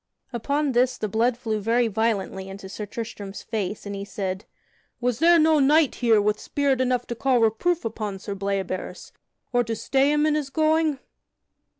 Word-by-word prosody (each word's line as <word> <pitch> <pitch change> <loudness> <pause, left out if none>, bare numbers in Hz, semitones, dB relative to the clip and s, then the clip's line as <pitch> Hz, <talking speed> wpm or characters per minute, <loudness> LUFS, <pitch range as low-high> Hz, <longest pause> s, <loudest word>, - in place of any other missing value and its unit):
Upon 280 +5 0
this 250 +1 +2
the 215 - -2
blood 230 +3 +1
flew 220 -3 -2
very 230 +3 +2
violently 205 -3 -1
into 195 0 -9
Sir 205 +2 -6
Tristram's 205 -3 -7
face, 210 -2 -4
and 200 - -5
he 200 0 -5
said: 195 -1 -4 0.5
"Was 245 -1 -1
there 340 +2 +6
no 315 -1 +4
knight 295 +1 +4
here 230 -3 +5
with 210 +1 +1
spirit 275 -2 0
enough 250 -1 +1
to - - -4
call 260 +2 +2
reproof 235 +10 +1
upon 215 -3 -4
Sir 200 +1 -6
Bleoberis, 195 -2 -4 0.4
or 245 0 +3
to 225 -1 -3
stay 270 +5 +2
him 300 0 +2
in 310 - +2
his 300 -2 -1
going?" 310 0 +2
230 Hz, 180 wpm, -24 LUFS, 205-275 Hz, 0.5 s, there